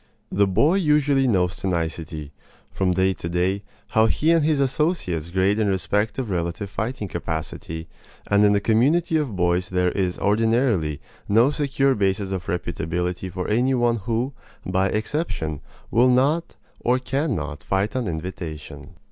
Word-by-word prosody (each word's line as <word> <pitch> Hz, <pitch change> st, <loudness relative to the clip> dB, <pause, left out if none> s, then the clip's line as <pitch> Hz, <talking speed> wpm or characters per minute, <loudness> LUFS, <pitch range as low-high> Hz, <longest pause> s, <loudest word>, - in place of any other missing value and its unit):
The 100 Hz, +1 st, +3 dB
boy 150 Hz, -, +3 dB
usually 145 Hz, -6 st, +3 dB
knows 90 Hz, -6 st, +1 dB
to -, -, -4 dB
nicety, 80 Hz, -3 st, -3 dB, 0.4 s
from 95 Hz, -2 st, +1 dB
day 95 Hz, +1 st, +2 dB
to 85 Hz, -1 st, -6 dB
day, 90 Hz, +3 st, 0 dB, 0.3 s
how 110 Hz, 0 st, +4 dB
he 155 Hz, +8 st, +2 dB
and 165 Hz, -2 st, +4 dB
his 150 Hz, -1 st, +2 dB
associates 135 Hz, -, 0 dB
grade 95 Hz, +4 st, +2 dB
in 110 Hz, -, +2 dB
respect 100 Hz, +2 st, 0 dB
of 125 Hz, -6 st, -3 dB
relative 90 Hz, +3 st, -2 dB
fighting 110 Hz, +1 st, -3 dB
capacity; 80 Hz, -1 st, -5 dB, 0.4 s
and 100 Hz, 0 st, +3 dB
in 105 Hz, 0 st, +5 dB
the 100 Hz, -, +3 dB
community 140 Hz, +11 st, +2 dB
of 140 Hz, -9 st, -2 dB
boys 90 Hz, 0 st, +1 dB
there 90 Hz, -1 st, +1 dB
is 90 Hz, -3 st, -1 dB
ordinarily 105 Hz, -, +1 dB, 0.3 s
no 115 Hz, +7 st, +5 dB
secure 140 Hz, -2 st, +1 dB
basis 100 Hz, -2 st, 0 dB
of 95 Hz, -3 st, -4 dB
reputability 90 Hz, +1 st, -3 dB
for 90 Hz, +1 st, -4 dB
any 125 Hz, +5 st, +2 dB
one 120 Hz, -1 st, +2 dB
who, 115 Hz, +6 st, -2 dB, 0.3 s
by 95 Hz, +1 st, +1 dB
exception, 110 Hz, -, -2 dB, 0.3 s
will 125 Hz, +2 st, +5 dB
not 140 Hz, +7 st, +2 dB, 0.2 s
or 125 Hz, +1 st, +2 dB
can 135 Hz, +1 st, -1 dB
not 75 Hz, -2 st, -5 dB
fight 95 Hz, +4 st, -1 dB
on 125 Hz, -4 st, -1 dB
invitation. 80 Hz, -2 st, -6 dB
100 Hz, 155 wpm, -23 LUFS, 90-130 Hz, 0.4 s, in